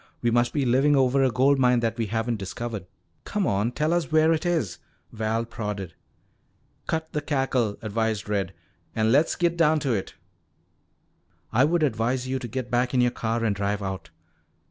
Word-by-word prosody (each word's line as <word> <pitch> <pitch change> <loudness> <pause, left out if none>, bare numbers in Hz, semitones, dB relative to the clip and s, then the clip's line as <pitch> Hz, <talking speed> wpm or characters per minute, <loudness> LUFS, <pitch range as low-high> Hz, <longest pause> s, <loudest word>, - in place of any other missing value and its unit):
We 120 - +2
must 120 +1 +2
be 145 -3 0
living 135 +4 +4
over 135 0 +3
a 130 - +4
gold 135 +3 +3
mine 125 -1 +4
that 115 -1 0
we 115 -2 -2
haven't 115 +2 -1
discovered. 105 0 -5 0.4
Come 205 -2 -1
on, 105 - +1
tell 155 +5 0
us 170 -5 -1
where 155 +1 +5
it 165 +3 -1
is," 140 - -1 0.3
Val 110 +1 -1
prodded. 105 -6 -5 0.9
"Cut 160 0 -2
the 150 - -1
cackle," 135 -7 0
advised 110 0 -1
Red, 100 -3 -2 0.4
"an' 110 0 +2
le's 145 +5 +3
git 170 -1 +1
down 160 -2 +3
to 135 -4 0
it." 100 -4 -3 1.4
"I 130 +4 +5
would 165 +1 +1
advise 125 0 0
you 130 0 -1
to 120 - -6
get 125 +1 -5
back 125 +2 +1
in 125 - +4
your 125 0 +3
car 115 -1 -2
and 105 -3 +1
drive 100 0 -1
out." 95 -2 -5
120 Hz, 185 wpm, -25 LUFS, 110-140 Hz, 1.4 s, where